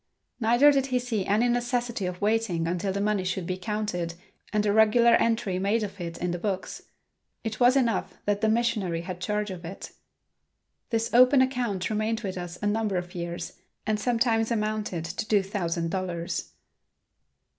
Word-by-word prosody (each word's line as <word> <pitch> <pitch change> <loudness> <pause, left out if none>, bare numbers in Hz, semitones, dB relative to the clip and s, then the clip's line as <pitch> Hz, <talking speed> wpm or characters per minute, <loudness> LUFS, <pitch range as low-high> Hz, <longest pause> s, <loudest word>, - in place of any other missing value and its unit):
Neither 240 +5 +5
did 275 -1 +1
he 255 -1 +1
see 235 -6 -2
any 215 +5 +3
necessity 240 -4 -1
of 180 +1 -6
waiting 210 -6 +1
until 180 +3 -1
the 200 - -2
money 205 -1 +1
should 185 -1 -2
be 185 - -2
counted 185 -4 -3 0.4
and 210 -1 +1
a 205 - +2
regular 220 +2 +5
entry 225 -5 +2
made 210 +4 +1
of 200 -2 -6
it 170 -1 -5
in 180 0 -2
the 175 - -3
books. 190 0 -3 0.6
It 220 -1 -4
was 250 +2 +5
enough 235 -4 0
that 205 0 0
the 220 - +3
missionary 220 -7 0
had 180 +1 -7
charge 210 +1 -1
of 180 -2 -8
it. 180 +4 -8 1.0
This 230 0 0
open 255 +3 +7
account 245 -8 0
remained 215 +2 0
with 195 -4 -4
us 175 -1 -6
a - - +1
number 210 -2 0
of 175 +1 -5
years 175 -1 -5 0.3
and 215 -1 0
sometimes 230 -2 +1
amounted 215 -6 -2
to 175 +6 -4
two 205 -2 +3
thousand 170 -4 -2
dollars. 180 -2 -3
210 Hz, 175 wpm, -27 LUFS, 180-230 Hz, 1.0 s, open